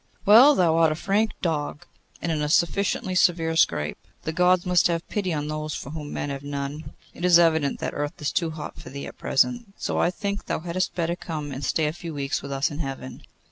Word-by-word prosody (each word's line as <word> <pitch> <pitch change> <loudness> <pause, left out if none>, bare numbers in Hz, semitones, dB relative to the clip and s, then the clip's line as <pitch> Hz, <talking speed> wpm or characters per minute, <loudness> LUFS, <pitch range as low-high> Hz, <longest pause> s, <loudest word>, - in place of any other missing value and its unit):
'Well, 245 +8 +8
thou 165 -3 +3
art 165 -1 +4
a - - -1
frank 205 +6 0
dog, 150 -3 -2 0.4
and 170 - 0
in 155 -2 -1
a 150 - -1
sufficiently 185 +3 +1
severe 170 -3 +2
scrape. 75 - +1 0.2
The 160 - -3
Gods 180 +1 +3
must 180 -1 +4
have 170 -1 -2
pity 200 -4 -1
on 150 -2 -2
those 155 0 -3
for 140 - -6
whom 150 -2 -6
men 145 - -3
have 135 -1 -5
none. 145 +2 -5 0.2
It - - -10
is 180 -1 +7
evident 160 -4 +3
that - - -2
Earth 145 0 -3
is 145 - -1
too 170 -2 0
hot 155 -1 -7
for - - -10
thee 140 +1 -6
at - - -10
present, 235 - 0
so - - -2
I - - +3
think 200 +2 -4
thou - - -2
hadst 175 +2 -2
better 170 0 0
come 155 -5 -5
and 135 +1 -6
stay 155 +3 +1
a 150 - -1
few 165 -2 -7
weeks 140 0 -2
with 140 - -7
us 140 +5 0
in 145 - -6
Heaven. 135 -3 -6
160 Hz, 230 wpm, -25 LUFS, 145-180 Hz, 0.4 s, Well